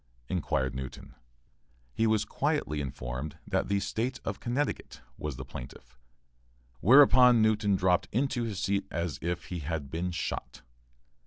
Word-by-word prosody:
inquired 65 -7 0
Newton. 65 0 -7 0.8
He 115 - +2
was 110 -1 +2
quietly 75 0 -1
informed 65 +3 -5
that 95 -2 0
the 100 0 +1
State 115 +6 -2
of - - -3
Connecticut 130 +4 -2 0.2
was 75 -3 -4
the 65 +1 -7
plaintiff, 60 0 -10 0.8
whereupon 125 - +7
Newton 105 -2 +3
dropped 90 -1 +2
into 130 +1 0
his 110 -4 -3
seat 100 0 0
as 85 -2 -3
if 90 +1 -2
he 90 - -2
had 75 -2 -4
been 85 +3 -2
shot. 85 -7 -4
90 Hz, 140 wpm, -29 LUFS, 75-110 Hz, 0.8 s, whereupon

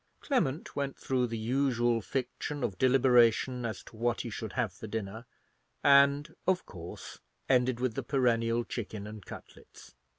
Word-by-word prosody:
Clement 175 - -1
went 140 -1 -2
through 125 -2 0
the 115 -1 -4
usual 120 0 +1
fiction 135 +4 -4
of 100 -6 -2
deliberation 125 -1 +4
as 110 - -6
to - - -15
what 120 +1 0
he - - -6
should - - -5
have - - -1
for 110 - -9
dinner, 110 +2 -5 0.6
and 140 +1 +5
of 185 -1 +2
course 85 -2 -9 0.3
ended 125 -2 +2
with 125 -2 0
the 135 - -3
perennial 120 -3 +1
chicken 110 -3 -5
and 105 -1 -9
cutlets. - - -13
120 Hz, 155 wpm, -30 LUFS, 115-135 Hz, 0.6 s, and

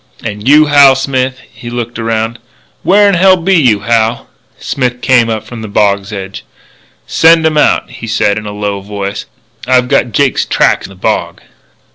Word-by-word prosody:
And 105 0 -6
you, 150 +2 +6
Hal 140 -2 +5
Smith," 130 -1 -2
he 120 +2 -10
looked 120 -1 -5
around 115 +1 -2 0.4
"where 205 +2 +3
'n 200 - +2
hell 185 +1 +4
be 185 +3 0
you, 125 - +2
Hal? 115 +1 0 0.2
" - - -41
Smith 125 -2 -3
came 125 -3 +2
up 110 -1 -3
from 115 0 -9
the 110 - -6
bog's 100 -1 0
edge. 95 -1 -7 0.6
"Send 165 0 +3
'em 160 -1 +1
out," - - +2
he 115 -2 -9
said 110 -2 0
in 105 - -9
a - - -5
low 105 -1 -4
voice. 100 0 -6 0.4
"I've 125 -1 +2
got 120 - +1
Jake's 135 +5 +1
tracks - - 0
in - - -18
the 95 - -14
bog." 95 - -3
120 Hz, 185 wpm, -11 LUFS, 105-135 Hz, 0.6 s, you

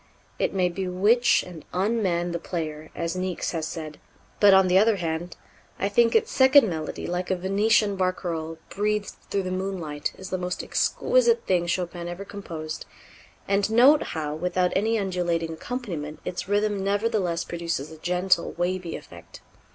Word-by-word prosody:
It - - +1
may 185 -2 +2
bewitch 195 +7 +2
and 175 -4 -10
unman 185 -3 0
the 170 - -2
player, 155 -3 -5
as 170 +1 -2
Niecks 185 -1 -2
has 160 -2 -2
said, 155 -3 -7 0.4
but, 205 -1 +7
on 190 -1 +6
the 185 +1 +5
other 220 +1 +4
hand, 170 -1 -4 0.4
I 200 - 0
think 230 +3 +3
its 225 - +3
second 265 -1 +6
melody, 160 -4 -4
like 180 +1 -3
a 185 - +2
Venetian 200 +3 +2
barcarolle 170 -3 -2
breathed 210 0 -1 0.2
through 195 - 0
the 185 - -3
moonlight, 185 -6 -3
is 190 - -9
the 185 - -1
most 180 0 -3
exquisite 475 -1 +2
thing 175 -2 +1
Chopin 175 0 -2
ever 175 +3 -6
composed; 165 -6 -7 0.6
and 200 +1 +2
note 260 +7 +6 0.2
how, 150 -1 -2
without 180 +3 0
any 220 +3 +2
undulating 175 -4 -1
accompaniment, 160 - -5
its 180 +1 -4
rhythm 205 -1 +1
nevertheless 200 -4 0
produces 170 -4 -4
a 160 - -10
gentle 180 +1 +1
wavy 175 0 -2
effect. - - -12
185 Hz, 160 wpm, -25 LUFS, 170-205 Hz, 0.6 s, but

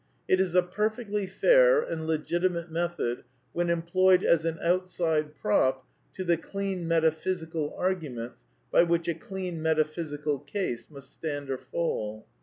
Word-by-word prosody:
It 185 - +4
is 185 -2 +1
a 180 - +6
perfectly 210 +2 -2
fair - - +5
and 160 - -3
legitimate 170 +2 -1
method 170 -8 -2 0.3
when 175 0 0
employed 180 +2 +3
as 165 -1 +3
an 165 -1 -1
outside 170 -4 0
prop 130 +2 +1 0.3
to 190 - -3
the 175 -2 +2
clean 190 0 -4
metaphysical 160 -1 0
arguments 150 -11 -3 0.3
by - - +6
which 170 -1 +1
a 170 - +1
clean 185 -3 -5
metaphysical 155 -2 0
case 145 - -4
must 140 -3 -11
stand 145 -3 -4
or 130 - -2
fall. 110 -7 -3
170 Hz, 140 wpm, -28 LUFS, 155-185 Hz, 0.3 s, a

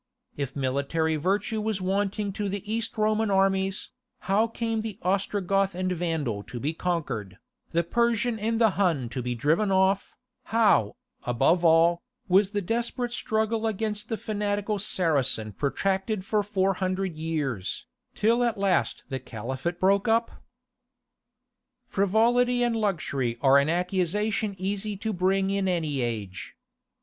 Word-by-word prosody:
If 140 -2 -4
military 140 +4 0
virtue 200 +7 0
was 215 -2 -1
wanting 195 +2 -1
to 205 0 -2
the 200 +1 -4
East 225 0 -2
Roman 215 0 +2
armies, 195 0 +1 0.3
how 205 +4 +2
came 225 -1 -2
the 215 -3 -5
Ostrogoth 195 0 +1
and 185 0 -1
Vandal 160 - -1
to 120 +4 -8
be 150 +6 -1
conquered, 160 - -3 0.3
the 170 +1 +2
Persian 235 +3 +1
and 225 +2 0
the 225 -3 +5
Hun 165 -12 +1
to 125 +2 -4
be 125 0 -2
driven 160 - +1
off, 190 +1 +2 0.3
how, 225 +1 +3 0.3
above 135 +8 +2
all, 170 +1 +5 0.3
was 190 +1 +4
the 205 -1 -2
desperate 235 +4 -2
struggle 220 -1 0
against 210 0 -3
the 225 - -1
fanatical 205 -1 -2
Saracen 140 - +1
protracted 190 - -1
for 210 +1 +1
four 195 -1 +1
hundred 185 -1 -2
years, 150 - -3 0.3
till 235 +3 +3
at 235 -2 0
last 195 -1 +1
the 135 -2 -3
Caliphate 130 +8 -5
broke 195 +3 +3
up? 230 +1 +2 1.5
Frivolity 240 +5 +2
and 240 -1 +1
luxury 155 - -1
are 135 +1 +6
an 140 +2 +1
accusation 195 +4 0
easy 200 +2 -2
to 220 +2 -3
bring 190 +1 +1
against 195 -1 0
any 155 -6 -1
age. 105 -6 -4
195 Hz, 140 wpm, -26 LUFS, 160-215 Hz, 1.5 s, are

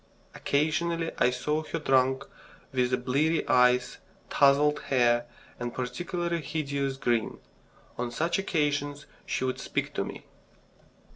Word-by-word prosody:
Occasionally, 165 +3 0
I 125 - +5
saw 150 +5 -1
her 155 - -4
drunk, 135 -2 +2 0.5
with 125 -1 0
bleary 155 +5 +1
eyes, 125 0 +3 0.3
tousled 145 +1 +4
hair, 120 -2 +3 0.3
and 120 0 -3
a - - -16
particularly 170 +6 -2
hideous 140 -3 -2
grin. 120 -4 0 0.6
On 125 0 -1
such 165 +10 0
occasions 145 -5 -1 0.2
she - - -1
would 130 0 -1
speak - - -3
to - - -1
me. - - -8
140 Hz, 125 wpm, -28 LUFS, 125-155 Hz, 0.6 s, I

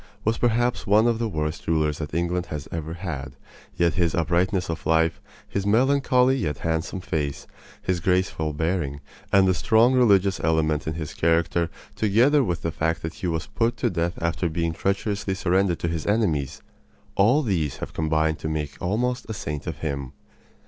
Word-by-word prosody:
was 110 +1 +1
perhaps 120 +1 +1
one 105 +3 +5
of 115 -1 +2
the 115 -1 -1
worst 75 -2 -3
rulers 75 -2 +1
that 75 - -5
England 85 +1 -1
has 75 -3 -6
ever 80 0 -4
had; 80 -7 -5 0.4
yet 85 -1 +2
his 85 -3 +1
uprightness 90 +4 +1
of 80 -2 -4
life, 80 0 +2 0.3
his 100 - -2
melancholy 130 +3 +3
yet 75 - -2
handsome 80 +3 -2
face, 75 -6 -3 0.4
his 90 -2 0
graceful 90 -3 0
bearing, 75 -2 -1 0.3
and 100 -1 +5
the 95 - +4
strong 110 +6 +4
religious 100 -6 +4
element 80 -1 +1
in 80 - -2
his 80 -2 -5
character, 85 +1 +1 0.3
together 120 +8 +4
with 85 -7 -2
the 85 - -1
fact 80 +1 -1
that 80 0 -4
he 90 - -4
was 80 -1 -1
put 115 0 -1
to - - 0
death 85 0 -1
after 85 0 0
being 85 0 -1
treacherously 100 +2 -1
surrendered 95 -1 +1
to - - -2
his 85 -2 -3
enemies 90 - 0 0.5
all 120 +10 +4
these 85 - -1
have - - -7
combined 80 0 0
to 80 - -3
make 75 -3 -4
almost 120 +7 -1
a 110 - -3
saint 75 -6 -5
of 80 -4 -4
him. 70 -3 -3
85 Hz, 175 wpm, -24 LUFS, 80-100 Hz, 0.5 s, one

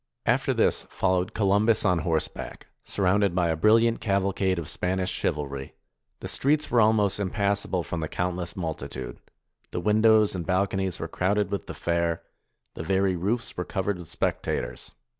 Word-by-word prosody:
After - - +2
this, - - +2
followed 95 -1 0
Columbus 105 +2 +3
on 90 -3 +3
horseback, 80 0 -3 0.2
surrounded 100 -1 +1
by 90 -2 +2
a 80 - +1
brilliant 115 +6 +3
caval 100 -1 +1
cade 95 -2 +1
of 85 - -4
Spanish 95 +1 -1
chivalry. 70 -2 -3 0.5
The - - -5
streets 145 +3 +1
were 120 - +5
almost 105 -2 +3
im 100 -2 -1
passable 100 -3 0
from 85 - -4
the 80 - -2
countless 90 +1 -3
multitude; 70 -7 -5 0.5
the - - -3
windows 110 +2 +4
and 90 -2 -3
balconies 95 0 0
were - - -3
crowded 100 +1 0
with 100 - -3
the - - -6
fair; 85 -1 -1 0.5
the - - -6
very 95 +2 +1
roofs 105 +7 -2
were 90 - -2
covered 95 0 -2
with 85 - -10
spectators. - - -3
95 Hz, 160 wpm, -26 LUFS, 85-100 Hz, 0.5 s, were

